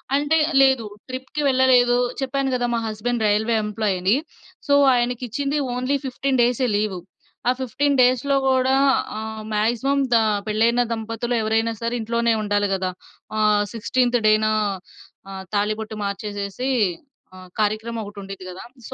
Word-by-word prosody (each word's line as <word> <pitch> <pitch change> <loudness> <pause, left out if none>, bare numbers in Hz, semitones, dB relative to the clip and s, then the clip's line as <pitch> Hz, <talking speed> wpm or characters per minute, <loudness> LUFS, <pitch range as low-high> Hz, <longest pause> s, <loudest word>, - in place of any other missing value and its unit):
అంటే, 295 +3 +2
ఆహ్, 290 - -4
లేదు. 265 -4 +4 0.2
ట్రిప్‌కి 260 +3 -5
వెళ్ళలేదు, 255 -2 +4 0.2
చెప్పాను 270 0 -1
గదా! 245 -1 0
మా 230 - +1
హస్బండ్ 220 +2 -2
రైల్వే 220 +3 +1
ఎంప్లాయని. 205 -1 0 0.5
సో, 285 - +3 0.2
ఆయనికిచ్చింది, 250 +4 -1 0.2
ఓన్లీ 255 +3 -1
15 265 0 -1
డేసే 245 +1 +2
లీవు. 205 -4 -2 0.5
ఆ - - +5
15 275 +3 0
డేస్‌లో 255 +3 +3
గూడా 260 0 +3 0.4
ఆహ్, 220 0 -6
మాక్సిమం 240 +6 +1
దా 225 - +5 0.3
పెళ్లయిన 230 +3 +2
దంపతులు 230 +2 -3
ఎవరైనా 225 +1 0
సరే, 230 +1 -2
ఇంట్లోనే 235 +1 +1
ఉండాలి 205 -1 0
గదా! 185 -1 -1 0.5
ఆహ్, 210 -1 +3
16థ్ 245 +2 +1
డేనా, 215 0 +3 0.8
ఆహ్, 190 -1 -7
తాళిబొట్టు 215 +1 -1
మార్చేసేసి, 200 +4 -4 0.7
ఆహ్, 185 -1 -13
కార్యక్రమం 220 +2 -1
ఒకటుండిద్ది 195 -2 -9
గదా! 185 +5 -9 0.2
సో, - - -8
230 Hz, 135 wpm, -22 LUFS, 210-255 Hz, 0.8 s, ఆ